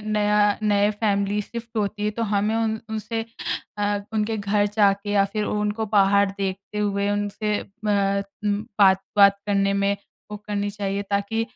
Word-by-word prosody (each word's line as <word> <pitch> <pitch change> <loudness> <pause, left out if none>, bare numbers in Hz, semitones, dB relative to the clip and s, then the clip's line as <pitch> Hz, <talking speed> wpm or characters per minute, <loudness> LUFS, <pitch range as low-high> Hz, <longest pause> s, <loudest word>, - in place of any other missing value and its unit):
नया 210 -1 +3
नए 205 -1 +3
family 205 -1 0
shift 235 +1 -8
होती 210 0 -1
है, 210 - +1
तो 230 +2 -4
हमें 210 0 +1
उन 220 -1 0
उनसे 225 +1 -3 0.5
अ, 205 0 +1
उनके 220 0 0
घर 205 0 +1
जाके 205 -1 +2
या 200 -1 +4
फिर 210 +1 -2
उनको 210 +1 -1
बाहर 200 0 +4
देखते 195 +1 -4
हुए 200 -1 0
उनसे 205 +1 -1 0.3
म 210 - +1 0.5
उम, 205 0 0 0.2
बात-वात 200 +1 +5
करने 195 -1 +2
में 200 0 +1 0.3
वो 210 - -4
करनी 205 0 -3
चाहिए। 200 -1 -3
ताकि 200 +3 -1
205 Hz, 155 wpm, -23 LUFS, 200-210 Hz, 0.5 s, बात-वात